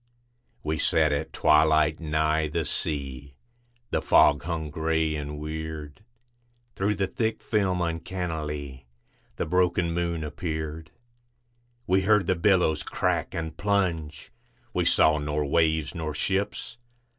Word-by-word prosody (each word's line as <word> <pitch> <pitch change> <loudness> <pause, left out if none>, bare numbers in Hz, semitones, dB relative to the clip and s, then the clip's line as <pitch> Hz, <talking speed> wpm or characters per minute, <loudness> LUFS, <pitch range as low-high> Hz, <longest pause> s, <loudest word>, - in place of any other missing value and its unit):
We 75 0 -2
sat 80 +1 +4
at 75 +2 -2
twilight 75 0 +3
nigh 80 0 +1
the 80 +1 -2
sea, 70 -3 -4 0.6
The - - +1
fog 75 -1 +5
hung 80 -2 -4
gray 80 0 0
and 75 0 -5
weird. 80 +2 -6 0.7
Through 100 +2 0
the 95 0 0
thick 110 +4 -2
film 95 -5 0
uncannily 80 -6 -4 0.5
The - - -2
broken 90 0 +1
moon 85 -2 -1
appeared. 80 0 -5 1.0
We 95 0 +3
heard 105 0 +3
the - - +2
billows 90 -4 +2
crack - - -1
and 80 -2 -4
plunge, 85 -7 -1 0.4
We - - 0
saw 75 0 +4
nor 75 0 -1
waves 80 0 +1
nor 80 -4 -4
ships. 100 +6 -2
80 Hz, 120 wpm, -26 LUFS, 75-90 Hz, 1.0 s, fog